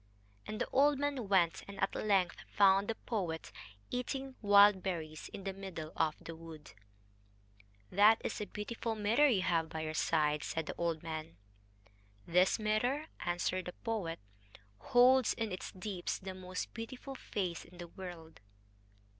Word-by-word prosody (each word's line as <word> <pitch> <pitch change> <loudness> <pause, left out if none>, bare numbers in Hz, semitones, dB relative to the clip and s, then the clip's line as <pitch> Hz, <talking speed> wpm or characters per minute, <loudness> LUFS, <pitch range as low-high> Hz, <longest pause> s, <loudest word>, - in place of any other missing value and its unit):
And 215 - -5
the - - 0
old 285 +1 +4
man 280 -5 -1
went, 175 -4 +3
and 200 - -9
at 195 - +1
length 195 -4 +1
found 195 0 +5
the 225 - -1
poet 180 -10 -3 0.4
eating 265 +2 -3
wild 205 -2 +7
berries 160 -5 -4
in 195 - -7
the 195 0 -3
middle 185 -5 -7
of 155 -2 +1
the 165 - -7
wood. 160 -2 -11 1.2
"That 210 +4 +6
is - - -3
a 210 - -3
beautiful 225 +2 -4
mirror 220 +8 +4
you 205 -9 +2
have 165 -3 +1
by 160 -1 -4
your 155 0 -3
side," 150 -2 +1
said 160 -1 -2
the - - -4
old 165 -2 -1
man. 155 - -6 0.9
"This 180 +2 +4
mirror," 245 +8 0
answered 175 +1 -1
the 180 - -5
poet, 205 -8 -3 0.6
"holds 250 - +5
in 225 -3 -2
its 185 - -5
deeps 185 -1 -4
the 190 0 -7
most 185 -1 -5
beautiful 250 +4 -7
face 185 -9 -3
in 175 - -16
the 175 -1 -7
world." 170 -3 -9
190 Hz, 155 wpm, -34 LUFS, 165-220 Hz, 1.2 s, wild